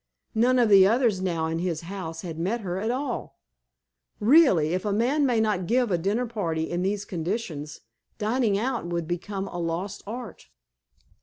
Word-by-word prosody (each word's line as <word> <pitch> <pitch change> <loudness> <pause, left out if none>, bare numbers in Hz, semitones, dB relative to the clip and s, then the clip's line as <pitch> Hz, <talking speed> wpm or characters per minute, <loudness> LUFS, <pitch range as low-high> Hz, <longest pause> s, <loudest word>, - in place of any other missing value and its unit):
None 245 +3 +3
of 240 -2 +4
the 195 -2 +7
others 225 -3 +2
now 170 -4 -1
in 160 +1 -2
his 170 -3 -2
house 165 -2 -6
had 165 -3 -6
met 210 +8 -1
her 185 -2 -3
at 220 +3 -2
all. 265 +4 -3 0.8
Really, 220 - +5
if 185 - -1
a 210 - -1
man 260 +8 +2
may 240 -3 +2
not 205 -5 0
give 245 -1 +2
a 175 - +3
dinnerparty 200 -5 -1
in 175 +1 -2
these 200 +2 -1
conditions, 165 -5 -4 0.4
dining 220 -1 +1
out 235 -4 -2
would 170 -2 -2
become 190 +3 -3
a 175 - -6
lost 175 +4 -3
art." 230 - -8
195 Hz, 170 wpm, -26 LUFS, 175-230 Hz, 0.8 s, the